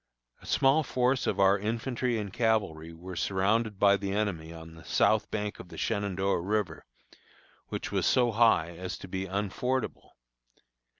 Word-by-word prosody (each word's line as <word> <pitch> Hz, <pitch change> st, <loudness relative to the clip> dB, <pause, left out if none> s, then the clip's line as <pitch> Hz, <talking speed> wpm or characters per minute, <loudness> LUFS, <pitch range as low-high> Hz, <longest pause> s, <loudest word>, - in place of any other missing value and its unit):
A -, -, -13 dB
small 135 Hz, +4 st, +4 dB
force 125 Hz, -1 st, 0 dB
of 100 Hz, -, 0 dB
our 100 Hz, +1 st, +5 dB
infantry 115 Hz, +3 st, -1 dB
and 100 Hz, -3 st, -5 dB
cavalry 100 Hz, -9 st, 0 dB
were 90 Hz, +3 st, -9 dB
surrounded 100 Hz, +4 st, 0 dB
by 100 Hz, 0 st, +5 dB
the 100 Hz, -1 st, -4 dB
enemy 95 Hz, -6 st, -2 dB
on 80 Hz, 0 st, -10 dB
the 80 Hz, -, -13 dB
south 110 Hz, -1 st, +2 dB
bank 105 Hz, -1 st, -3 dB
of 90 Hz, -, -10 dB
the -, -, -10 dB
Shenandoah 100 Hz, -4 st, 0 dB
River, 100 Hz, -3 st, -2 dB, 0.8 s
which -, -, -5 dB
was -, -, +1 dB
so 125 Hz, -2 st, +3 dB
high 110 Hz, -7 st, +3 dB
as 90 Hz, +1 st, -5 dB
to -, -, -10 dB
be 95 Hz, +1 st, -4 dB
unfordable. 105 Hz, +7 st, -2 dB
100 Hz, 160 wpm, -29 LUFS, 95-115 Hz, 0.8 s, our